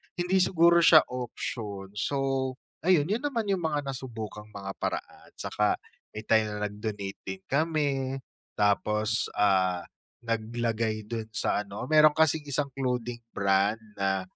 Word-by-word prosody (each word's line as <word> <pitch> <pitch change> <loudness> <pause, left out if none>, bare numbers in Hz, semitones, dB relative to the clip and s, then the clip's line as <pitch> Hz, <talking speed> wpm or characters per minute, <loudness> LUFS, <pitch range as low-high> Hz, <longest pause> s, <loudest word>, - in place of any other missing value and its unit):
hindi 180 +2 +1
siguro 170 -1 +5
siya 155 -2 +9
option. 110 -5 -5
So, 135 +1 0 0.3
ayun, 175 -3 +4
yun 230 +7 0
naman 230 -8 -1
yung 185 -4 0
mga 150 -2 0
nasubukang 115 -6 -6
mga 100 -1 -5
paraan. - - -4
Tsaka - - 0 0.4
may 110 0 -6
time 110 -1 +4
na 105 0 -2
nag-donate 105 -1 -5
din 95 0 -5
kami, 140 -3 0 0.3
tapos, 105 +2 +1
ah, 95 -3 +2 0.4
naglagay 115 -1 -1
dun 115 -2 -3
sa 105 +1 0
ano 100 +1 -7
meron 155 -1 +7
kasing 160 -1 +2
isang 140 0 -1
clothing 125 -2 -1 0.2
brand 100 +3 +2 0.2
na 95 -1 +1
120 Hz, 135 wpm, -28 LUFS, 105-150 Hz, 0.4 s, siya